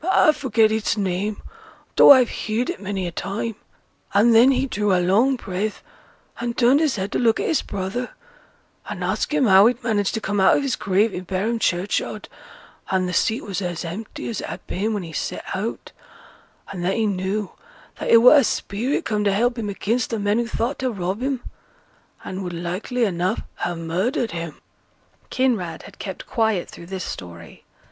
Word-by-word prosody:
I 370 -3 +5
forget 225 -7 +2
its 220 0 0
name, 200 +1 -2 0.5
though - - +9
I've 255 -4 +7
heared 225 +7 -2
it 355 - -9
many 195 -2 -3
a 175 - -3
time; 200 +6 -3 0.6
and 225 +4 +5
then 235 +4 +7
he 265 0 +2
drew 210 -6 -1
a 185 - +4
long 210 +10 +3
breath, 210 -2 -4 0.6
and 235 0 -3
turned 255 +4 +5
his 310 -6 +1
head 195 -1 -3
to - - 0
look 230 -2 +3
at - - -1
his 320 - +1
brother, 200 +6 -4 0.8
and - - -5
ask - - -1
him 300 -3 +2
how 195 0 +7
he'd 245 +1 -1
managed 215 -2 0
to - - -1
come 205 -1 -2
out 190 - +5
of - - -1
his 270 -2 0
grave 200 +2 +1
i' - - -3
Barum 195 +5 -2
churchyard, 185 -1 -1 0.6
and 185 -1 +1
th' 180 - -3
seat 225 +8 +1
was 200 -2 -4
as 175 -2 -3
empty 195 +7 -6
as 225 - -3
it - - -6
had - - -8
been 215 +3 -2
when 200 - -3
he 165 -2 -9
set - - -4
out; 210 +5 -4 0.8
and 180 -3 -5
then 190 +2 +1
he 225 - +1
knew 195 +1 -2 0.5
that - - -4
it 230 - +8
were 250 +5 +9
a 280 - +5
spirit 230 +4 -1
come 210 -1 0
to 200 - +2
help 240 +4 +1
him 210 -2 -3
against 225 +4 -1
th' 230 - -2
men 205 +2 +1
who 240 - -1
thought 235 +4 -2
to 260 - 0
rob 195 0 -3
him, 265 -2 -2 0.8
and 190 +1 -5
would 180 -1 -5
likely 180 +8 -2
enough 180 -2 -1
ha' 175 - -2
murdered 185 +9 -1
him.' 165 -2 -6 0.7
Kinraid 215 -11 -1
had - - -14
kept 190 -3 -6
quiet 220 -6 0
through 170 - -11
this 190 0 -5
story. 85 -2 -9
210 Hz, 195 wpm, -22 LUFS, 185-235 Hz, 0.8 s, though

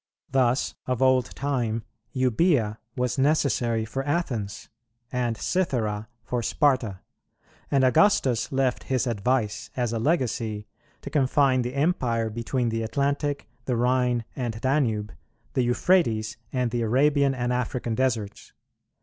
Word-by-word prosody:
Thus, 130 -1 +2
of 125 -2 -1
old 130 -2 +2
time, 120 -5 -1 0.3
Eubœa 130 -3 +2 0.2
was 125 +1 -1
necessary 130 -6 +2
for 135 +4 -3
Athens, 130 - -2 0.4
and 120 -3 -1
Cythera 110 - -1 0.2
for 120 +1 -2
Sparta; 120 - +1 0.7
and 135 -2 +3
Augustus 130 - +3
left 135 -2 0
his 130 -1 0
advice, 115 -1 -1
as 120 -2 0
a 115 - -1
legacy, 115 -7 0 0.4
to 140 - -7
confine 135 -2 +3
the 125 +2 -4
Empire 125 -7 +1
between 120 +2 -1
the 115 0 -1
Atlantic, 140 +3 -1 0.2
the 125 - 0
Rhine 125 -1 +1
and 120 -4 -3
Danube, 115 -6 0 0.4
the 130 - +2
Euphrates, 120 -4 +2 0.2
and 125 -3 0
the 120 0 -1
Arabian 140 +4 +3
and 120 0 -1
African 125 -1 -2
deserts. 110 -4 -2
125 Hz, 125 wpm, -26 LUFS, 115-135 Hz, 0.7 s, and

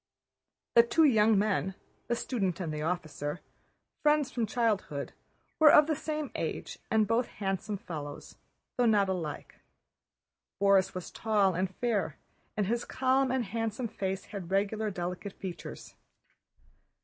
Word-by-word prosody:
The 235 - +9
two 240 +7 +3
young 220 -6 +5
men, 195 -2 +1 0.3
the 235 - +1
student 195 -8 -1
and 165 -4 -3
the 150 - -3
officer, 155 -2 -3 0.6
friends 295 -2 +3
from 235 -3 -1
childhood, 210 -11 -1 0.5
were 310 -2 +9
of 300 - +8
the 310 0 0
same 305 -1 -3
age - - -4
and 220 -1 +3
both 230 +3 +1
handsome 195 +1 -3
fellows, 150 -5 -7 0.4
though 245 -1 +4
not 205 -3 +4
alike. 165 -6 -4 1.0
Borís 195 -1 +4
was 180 - -6
tall 205 -4 +2
and 185 +2 0
fair, 230 -5 -1 0.4
and 210 - +2
his 235 +4 0
calm 265 +1 +1
and 260 -2 0
handsome 225 +3 -2
face 190 -1 -3
had 195 -5 -7
regular, 205 +3 0
delicate 180 +1 -4
features. 185 -3 -8
205 Hz, 135 wpm, -30 LUFS, 185-235 Hz, 1.0 s, The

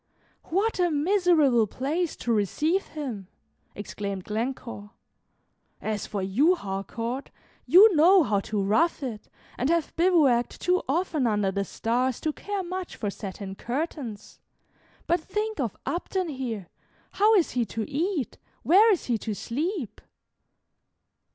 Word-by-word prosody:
"What 395 +5 0
a 355 -1 +3
miserable 305 - +3
place 305 - -2
to 235 - -1
receive 305 - 0
him!" 250 - -6 0.5
exclaimed 200 -2 -5
Glencore. 225 -1 -4 0.9
"As 215 -2 -3
for 200 -3 -3
you, 270 - +3
Harcourt, 230 - -4 0.4
you 390 +2 +8
know 350 +4 +6
how 205 -7 +1
to 200 0 -2
rough 295 - +2
it, 225 -5 -6 0.3
and 260 - +1
have 335 -1 0
bivouacked 310 -9 +3
too 365 +1 +2
often 310 -3 +1
under 205 -3 +1
the 200 +1 -1
stars 245 +4 -1
to 310 - -1
care 405 +2 -4
much 365 0 -5
for 205 -3 -3
satin 195 -1 -7
curtains. 245 -1 -5 0.7
But 345 - +2
think 425 +4 -3
of 235 -7 -2
Upton 365 0 -2
here! 235 - -5 0.4
How 430 +2 +4
is 360 -6 +3
he 245 - +1
to 220 0 -4
eat, 310 0 -2 0.2
where 415 +7 +6
is 375 - 0
he 235 -3 0
to 215 0 -4
sleep?" 295 - -3
270 Hz, 135 wpm, -26 LUFS, 215-350 Hz, 0.9 s, you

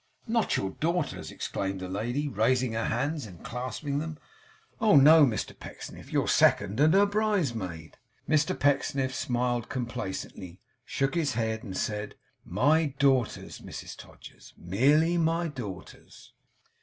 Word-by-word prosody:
'Not 230 -1 +1
your 95 - -2
daughters!' 170 - -2
exclaimed 95 -1 -4
the 95 - -5
lady, 120 +10 -2
raising 125 +1 +1
her 115 0 -1
hands 140 +3 -1
and 90 -4 -13
clasping 130 +4 -3
them. 160 0 -5 0.6
'Oh, 215 -7 +4
no, 150 +2 +8
Mr 110 -5 -3
Pecksniff! - - -10
Your - - +1
second, 100 +3 +3
and 155 +4 +5
her 200 +1 +6
bridesmaid!' 135 - -2 0.3
Mr 155 -1 +1
Pecksniff 135 -1 +1
smiled 120 -2 -1
complacently; 95 -6 -5 0.3
shook 135 -1 -1
his 165 -6 0
head; 110 -1 -1
and 95 -3 -6
said, 105 -1 -3 0.3
'My 145 - +2
daughters, 135 -5 +1
Mrs - - -8
Todgers. - - -14
Merely 145 - +2
my 165 +1 +1
daughters. 115 - -9
130 Hz, 130 wpm, -28 LUFS, 110-155 Hz, 0.6 s, no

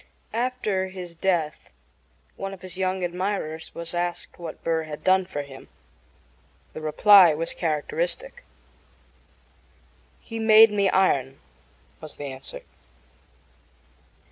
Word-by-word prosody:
After 225 -5 -1
his 185 -2 -8
death 165 -3 -1 0.7
one 195 0 -5
of 185 - -20
his 185 -1 -7
younger 185 0 -1
admirers 175 -3 -3
was 170 0 -6
asked 175 0 -4
what 165 -3 -8
Burr 160 -1 0
had 150 -1 -8
done 185 0 +3
for 145 -5 -4
him. 135 -1 -12 1.1
The 155 - -7
reply 175 +2 +6
was 165 +2 -2
characteristic. 485 - -3 1.8
"He 225 -1 -7
made 220 0 +7
me 200 -2 +2
iron," 135 -9 +1 0.6
was 155 - -10
the 145 - -6
answer. 130 0 -9
180 Hz, 115 wpm, -25 LUFS, 160-195 Hz, 1.8 s, made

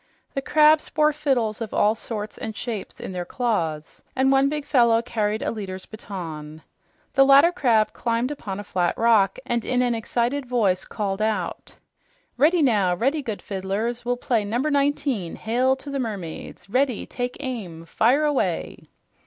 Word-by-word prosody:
The 275 - -2
crabs 305 +2 +4
bore 305 0 +2
fiddles 255 -8 0
of 220 - -4
all 210 +1 +4
sorts 215 -2 -6
and 220 -2 -5
shapes 225 -5 -5
in - - -6
their 180 -1 -3
claws, 170 -8 -2
and 265 +1 +3
one 270 0 +4
big 300 -1 -3
fellow 235 -4 +4
carried 215 -2 -1
a - - -1
leader's 190 -4 -6
baton. 160 -7 -8 0.5
The 270 - +6
latter 275 +5 +7
crab 235 -11 +2
climbed 235 +3 -1
upon 205 -9 -5
a - - -5
flat 180 -3 -1
rock 220 -4 +3
and 235 -1 -1
in 250 0 +1
an 245 -1 +1
excited 240 +4 -1
voice 210 -7 +1
called 200 -2 -3
out, 210 -5 -2 0.6
"Ready, 310 +6 +4
now 205 -9 +3
ready, 275 - 0
good 220 -6 -5
fiddlers. 205 +5 -3
We'll 245 +1 -1
play 235 -3 0
Number 240 +9 -1
19, 280 - 0
Hail 250 +4 +1
to 280 +2 -9
the 275 - -2
Mermaids. 200 -9 -6
Ready! 255 +2 0
Take 245 0 -4
aim! 205 - -6
Fire 250 - +2
away!" 295 -3 -1
235 Hz, 165 wpm, -24 LUFS, 205-270 Hz, 0.6 s, latter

